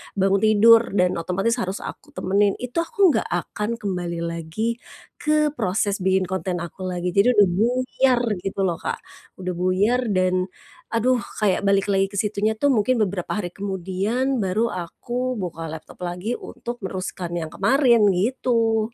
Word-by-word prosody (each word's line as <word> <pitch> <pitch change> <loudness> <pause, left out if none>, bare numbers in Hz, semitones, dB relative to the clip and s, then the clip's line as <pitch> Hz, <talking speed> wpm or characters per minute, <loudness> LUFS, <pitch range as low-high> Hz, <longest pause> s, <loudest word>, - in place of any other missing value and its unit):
bangun 195 0 +2
tidur 220 +1 +5
dan 180 -2 +2
otomatis 195 +8 0
harus 190 -3 -3
aku 295 0 -9
temenin, 200 +1 +2
itu 250 +6 -4
aku 365 +1 +3
nggak 225 - 0
akan 195 +4 -4
kembali 180 -7 -3
lagi 170 +8 -3 0.4
ke 305 0 +2
proses 200 -1 0
bikin 190 -1 +1
konten 185 -2 -2
aku 180 +2 -7
lagi. 180 -1 -2
Jadi 200 +7 +4
udah 205 -3 +6
buyar 250 +5 +2 0.2
gitu 195 0 -2
loh 175 -3 +1
Kak, - - -4 0.4
udah 180 0 -2
buyar 195 +7 +2
dan, 185 0 +2 0.5
aduh 250 +3 +3 0.2
kayak 200 -1 +2
balik 195 0 +2
lagi 195 0 +3
ke 195 - -12
situnya 210 +1 0
tuh 280 +6 +1
mungkin 235 -1 +2
beberapa 190 -3 -1
hari 195 -4 -2
kemudian, 195 +8 -2
baru 215 +3 0
aku 245 +8 -4
buka 165 -2 -5
laptop 160 0 -9
lagi 180 +7 -3
untuk 240 0 -7
meneruskan 185 -2 -4
yang 160 - -5
kemarin, 235 - +4
gitu. 225 +1 +1
200 Hz, 155 wpm, -23 LUFS, 185-235 Hz, 0.5 s, udah